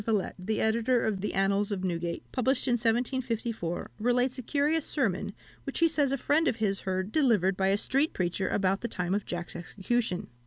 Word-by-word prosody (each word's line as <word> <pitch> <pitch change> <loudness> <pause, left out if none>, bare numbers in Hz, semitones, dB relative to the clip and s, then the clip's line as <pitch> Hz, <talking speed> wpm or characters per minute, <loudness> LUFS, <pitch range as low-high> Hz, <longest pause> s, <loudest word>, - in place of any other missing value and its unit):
Villette, 210 -3 0
the 210 +4 -2
editor 235 +2 +2
of 205 -4 -1
the 210 - -3
Annals 200 +2 +1
of 190 -2 -2
Newgate, 170 -2 -2
published 265 +2 0
in - - +2
1754, 230 -5 -1
relates 245 +3 +1
a - - -3
curious 295 +5 +1
sermon, 200 - 0 0.3
which 275 - -5
he 335 - +5
says 295 -4 +2
a 275 - +1
friend 310 +5 +2
of - - +2
his 205 -3 0
heard 190 +1 -2
delivered 220 - +3
by 190 0 +1
a 195 +1 +3
street 275 +8 +1
preacher 185 +1 -1
about 195 0 +1
the 235 - -2
time 180 -4 -2
of 205 0 -1
Jack's 175 -1 -4
execution. 195 +2 -2
220 Hz, 195 wpm, -29 LUFS, 190-255 Hz, 0.3 s, he